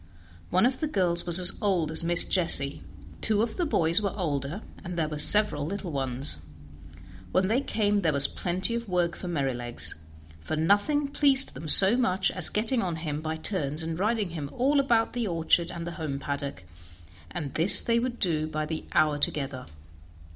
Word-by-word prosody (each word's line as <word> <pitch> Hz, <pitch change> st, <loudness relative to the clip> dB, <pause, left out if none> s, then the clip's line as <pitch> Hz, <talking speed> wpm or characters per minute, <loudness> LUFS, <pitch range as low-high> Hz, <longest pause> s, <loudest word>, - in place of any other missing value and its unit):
One 185 Hz, +4 st, +2 dB
of 260 Hz, +1 st, -1 dB
the 310 Hz, -, -2 dB
girls 180 Hz, -, -1 dB
was 170 Hz, -1 st, +9 dB
as 180 Hz, -1 st, +6 dB
old 180 Hz, -7 st, 0 dB
as 160 Hz, -, -3 dB
Miss 170 Hz, +1 st, +6 dB
Jessie; 150 Hz, -6 st, +1 dB, 0.4 s
two 215 Hz, -1 st, +1 dB
of 230 Hz, -, -4 dB
the 350 Hz, -3 st, -1 dB
boys 170 Hz, -, +1 dB
were 200 Hz, -1 st, -4 dB
older, 155 Hz, +1 st, -4 dB, 0.2 s
and 175 Hz, 0 st, -7 dB
there 160 Hz, -2 st, -1 dB
were 150 Hz, -1 st, -3 dB
several 205 Hz, -4 st, +5 dB
little 185 Hz, +2 st, -6 dB
ones. 135 Hz, -, -4 dB, 0.9 s
When 185 Hz, -, +1 dB
they 240 Hz, +5 st, 0 dB
came 210 Hz, -6 st, -1 dB
there 165 Hz, -5 st, 0 dB
was 140 Hz, -1 st, +4 dB
plenty 185 Hz, +5 st, +1 dB
of 235 Hz, -2 st, -5 dB
work 175 Hz, -2 st, -1 dB
for 180 Hz, -, -8 dB
Merrylegs, 130 Hz, -7 st, -3 dB, 0.5 s
for 80 Hz, -, -5 dB
nothing 205 Hz, -, 0 dB
pleased 280 Hz, -1 st, +3 dB
them 155 Hz, +5 st, -9 dB
so 195 Hz, +8 st, +7 dB
much 195 Hz, -6 st, 0 dB
as 180 Hz, -3 st, +3 dB
getting 230 Hz, +3 st, -1 dB
on 175 Hz, -5 st, -3 dB
him 155 Hz, -2 st, -5 dB
by 160 Hz, 0 st, -4 dB
turns 160 Hz, -3 st, -3 dB
and 160 Hz, +1 st, -5 dB
riding 210 Hz, -2 st, -1 dB
him 150 Hz, -4 st, -7 dB
all 275 Hz, +3 st, +1 dB
about 235 Hz, -5 st, 0 dB
the 240 Hz, -3 st, -3 dB
orchard 170 Hz, 0 st, 0 dB
and 170 Hz, -1 st, -7 dB
the 170 Hz, -, -6 dB
home 145 Hz, -3 st, -4 dB
paddock, 140 Hz, -7 st, -6 dB, 0.7 s
and 140 Hz, +9 st, -6 dB
this 165 Hz, +5 st, +6 dB
they 230 Hz, 0 st, 0 dB
would 240 Hz, 0 st, -4 dB
do 155 Hz, -6 st, -1 dB
by 155 Hz, 0 st, -4 dB
the 155 Hz, 0 st, -6 dB
hour 150 Hz, -1 st, +1 dB
together. 135 Hz, -3 st, -3 dB
175 Hz, 190 wpm, -26 LUFS, 155-210 Hz, 0.9 s, was